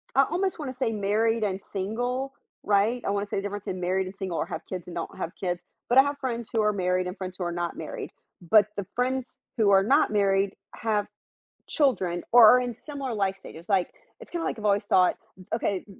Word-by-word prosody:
I 275 Hz, -, +7 dB
almost 370 Hz, 0 st, 0 dB
want 275 Hz, -4 st, -4 dB
to 255 Hz, -, -13 dB
say 230 Hz, -4 st, 0 dB
married 215 Hz, +2 st, +1 dB
and 195 Hz, -1 st, -1 dB
single, 245 Hz, +8 st, -3 dB, 0.3 s
right? 210 Hz, +4 st, +2 dB
I -, -, 0 dB
want 200 Hz, 0 st, 0 dB
to 205 Hz, -, -20 dB
say -, -, -2 dB
the 195 Hz, -, -2 dB
difference 205 Hz, 0 st, -5 dB
in 185 Hz, -, -3 dB
married 185 Hz, +2 st, 0 dB
and 190 Hz, +1 st, -8 dB
single 190 Hz, -4 st, -4 dB
or -, -, 0 dB
have 160 Hz, -, -5 dB
kids 180 Hz, -2 st, -5 dB
and 175 Hz, -, -8 dB
don't 165 Hz, -, -5 dB
have 165 Hz, -, -3 dB
kids. 180 Hz, -2 st, -2 dB, 0.3 s
But 245 Hz, -, +3 dB
I 270 Hz, -, +10 dB
have 285 Hz, 0 st, -2 dB
friends 235 Hz, -3 st, -3 dB
who 225 Hz, -, +3 dB
are 210 Hz, 0 st, +3 dB
married 185 Hz, -2 st, 0 dB
and 180 Hz, -, -6 dB
friends 185 Hz, -1 st, -6 dB
who 185 Hz, -, -3 dB
are 175 Hz, -, -2 dB
not 175 Hz, 0 st, -3 dB
married, -, -, -6 dB, 0.3 s
but 205 Hz, +4 st, +5 dB
the 200 Hz, -, -2 dB
friends 255 Hz, +1 st, -2 dB, 0.2 s
who 205 Hz, -3 st, +4 dB
are 195 Hz, 0 st, +6 dB
not 280 Hz, +8 st, +4 dB
married 195 Hz, -1 st, +2 dB, 0.2 s
have 215 Hz, -2 st, 0 dB, 0.6 s
children 190 Hz, -, +1 dB
or 235 Hz, -2 st, +9 dB
are 250 Hz, +3 st, +7 dB
in 245 Hz, -2 st, -4 dB
similar 275 Hz, -5 st, -5 dB
life 195 Hz, -2 st, 0 dB
stages, 170 Hz, -3 st, -12 dB
like, 195 Hz, -4 st, +1 dB, 0.3 s
it's -, -, -12 dB
kinda, 340 Hz, -1 st, -2 dB
like, -, -, -2 dB
I've 215 Hz, -, -9 dB
always 205 Hz, 0 st, +2 dB
thought, 185 Hz, -2 st, +4 dB, 0.4 s
okay, 200 Hz, -4 st, -1 dB
205 Hz, 235 wpm, -27 LUFS, 190-245 Hz, 0.6 s, I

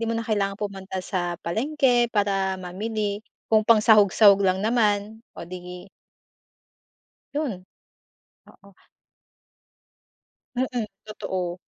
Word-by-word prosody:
'Di 230 Hz, -, -1 dB
mo 230 Hz, -, -1 dB
na 230 Hz, -, -3 dB
kailangang 200 Hz, -2 st, 0 dB
pumunta 195 Hz, -2 st, -5 dB
sa 175 Hz, -2 st, -2 dB
palengke 245 Hz, -, +1 dB
para 195 Hz, -2 st, 0 dB
mamili 205 Hz, +3 st, -3 dB, 0.3 s
kung 215 Hz, -, +6 dB
pangsahog-sahog 210 Hz, -2 st, +6 dB
lang 190 Hz, 0 st, +2 dB
naman, 215 Hz, -1 st, +1 dB, 0.2 s
o -, -, -7 dB
'di 180 Hz, +1 st, -9 dB, 1.5 s
yo'n. 230 Hz, -12 st, -3 dB, 0.8 s
Oo. 200 Hz, -1 st, -19 dB, 1.8 s
Mm, 250 Hz, -3 st, -1 dB, 0.2 s
totoo. 185 Hz, -4 st, -4 dB
205 Hz, 95 wpm, -24 LUFS, 190-225 Hz, 1.8 s, kung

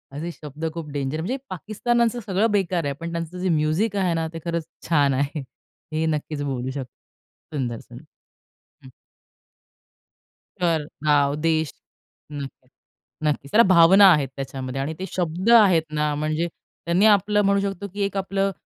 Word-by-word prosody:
असे 170 Hz, +4 st, -4 dB
शब्द 150 Hz, 0 st, -8 dB
खूप 165 Hz, -3 st, -6 dB
डेंजर 140 Hz, +1 st, -2 dB
म्हणजे 245 Hz, +11 st, -2 dB
पाकिस्तानाचं 235 Hz, +5 st, 0 dB
सगळं 205 Hz, +3 st, +1 dB
बेकार 185 Hz, -4 st, +1 dB
आहे, 140 Hz, -, -1 dB
पण 170 Hz, 0 st, -5 dB
त्यांचं 170 Hz, +1 st, -4 dB
जे 185 Hz, -, 0 dB
म्युझिक 165 Hz, +7 st, +1 dB
आहे 185 Hz, -3 st, +1 dB
ना, 165 Hz, -1 st, -1 dB
ते 165 Hz, -, -5 dB
खरंच 170 Hz, -2 st, -2 dB, 0.2 s
छान 145 Hz, -4 st, +3 dB
आहे. 140 Hz, +3 st, -1 dB, 0.5 s
हे 160 Hz, +1 st, 0 dB
नक्कीच 150 Hz, -1 st, -2 dB
बोलू 130 Hz, -2 st, -3 dB
शकतो. 130 Hz, -2 st, -6 dB, 0.6 s
सुंदर, 120 Hz, -5 st, -2 dB
सुंदर, 125 Hz, +5 st, -13 dB, 0.8 s
हं. 130 Hz, -, -12 dB, 1.7 s
तर 165 Hz, -3 st, +2 dB, 0.2 s
गाव, 145 Hz, -1 st, +3 dB
देश 160 Hz, 0 st, 0 dB, 0.6 s
नक्की, 140 Hz, -3 st, -8 dB, 0.6 s
नक्कीच. 145 Hz, -1 st, -2 dB
त्याला 230 Hz, +2 st, +7 dB
भावना 185 Hz, +3 st, +8 dB
आहेत, 150 Hz, -5 st, +3 dB
त्याच्यामध्ये 135 Hz, -1 st, -5 dB
आणि 150 Hz, +3 st, -3 dB
ते 190 Hz, -, -3 dB
शब्द 180 Hz, +3 st, -1 dB
आहेत 195 Hz, -8 st, +6 dB
ना, 150 Hz, 0 st, 0 dB
म्हणजे 155 Hz, +3 st, -1 dB, 0.4 s
त्यांनी 175 Hz, +4 st, +3 dB
आपलं 210 Hz, 0 st, +4 dB
म्हणू 200 Hz, 0 st, +3 dB
शकतो 200 Hz, 0 st, -3 dB
की 205 Hz, -, -4 dB
एक 200 Hz, 0 st, -4 dB
आपलं, 195 Hz, 0 st, 0 dB
165 Hz, 155 wpm, -23 LUFS, 145-195 Hz, 1.7 s, भावना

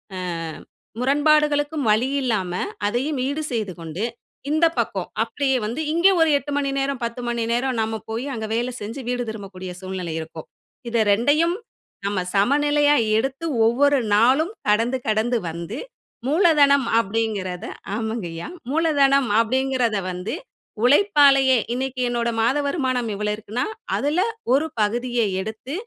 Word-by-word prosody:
அ -, -, -5 dB, 0.8 s
முரண்பாடுகளுக்கும் 290 Hz, +1 st, +2 dB
வழியில்லாம 225 Hz, -5 st, +1 dB, 0.3 s
அதையும் 260 Hz, +6 st, -1 dB
ஈடு 285 Hz, +3 st, -2 dB
செய்துகொண்டு, 185 Hz, -5 st, -4 dB, 0.5 s
இந்த 315 Hz, +2 st, +3 dB
பக்கம் -, -, -1 dB, 0.2 s
அப்டியே 270 Hz, -2 st, 0 dB
வந்து 235 Hz, +8 st, -3 dB
இங்க 340 Hz, +4 st, +4 dB
ஒரு 325 Hz, -, +4 dB
8 285 Hz, +1 st, -6 dB
மணி 280 Hz, -1 st, 0 dB
நேரம், 275 Hz, -1 st, -1 dB
10 235 Hz, +1 st, -3 dB
மணி 235 Hz, -1 st, -1 dB
நேரம் 250 Hz, +1 st, 0 dB
நம்ம 220 Hz, 0 st, -2 dB
போய், 230 Hz, +4 st, -3 dB
அங்க 220 Hz, -2 st, -4 dB
வேல 240 Hz, +2 st, 0 dB
செஞ்சு 225 Hz, +6 st, -5 dB
வீடு 245 Hz, 0 st, -1 dB
திரும்பக்கூடிய 190 Hz, -4 st, -7 dB
சூழ்நிலை 185 Hz, -3 st, -5 dB
இருக்கும். 160 Hz, 0 st, -8 dB, 0.4 s
இது 235 Hz, -1 st, +1 dB
2யும் 295 Hz, -, +3 dB, 0.5 s
நம்ம 200 Hz, -1 st, 0 dB
சமநிலையா 290 Hz, +7 st, +3 dB, 0.2 s
எடுத்து 270 Hz, +7 st, -2 dB, 0.2 s
ஒவ்வொரு 280 Hz, +5 st, +3 dB, 0.2 s
நாளும் 265 Hz, -, +3 dB, 0.2 s
கடந்து 230 Hz, +5 st, +2 dB
கடந்து 220 Hz, +3 st, +1 dB
வந்து, 170 Hz, +7 st, -6 dB, 0.5 s
மூலதனம் 290 Hz, -4 st, +4 dB, 0.2 s
அப்டிங்கறத, 200 Hz, -4 st, -3 dB, 0.3 s
ஆமாங்க 220 Hz, -3 st, -3 dB
ஐயா, 165 Hz, -, -6 dB, 0.2 s
மூலதனம் 280 Hz, -5 st, +3 dB
அப்படிங்கறத 255 Hz, -2 st, 0 dB
வந்து 180 Hz, +3 st, -4 dB, 0.5 s
உழைப்பாலயே 275 Hz, -3 st, +5 dB, 0.2 s
இன்னைக்கு 260 Hz, 0 st, -3 dB
என்னோட 235 Hz, -1 st, 0 dB
மாத 245 Hz, +6 st, +2 dB
வருமானம் 255 Hz, -6 st, -1 dB
இவ்வளவு 210 Hz, +1 st, -1 dB
இருக்குன்னா 220 Hz, +4 st, -3 dB, 0.3 s
அதுல 295 Hz, +5 st, 0 dB, 0.3 s
ஒரு 290 Hz, +4 st, +2 dB
பகுதியை 240 Hz, +2 st, 0 dB
எடுத்து, 220 Hz, +7 st, -7 dB
245 Hz, 130 wpm, -22 LUFS, 220-280 Hz, 0.8 s, உழைப்பாலயே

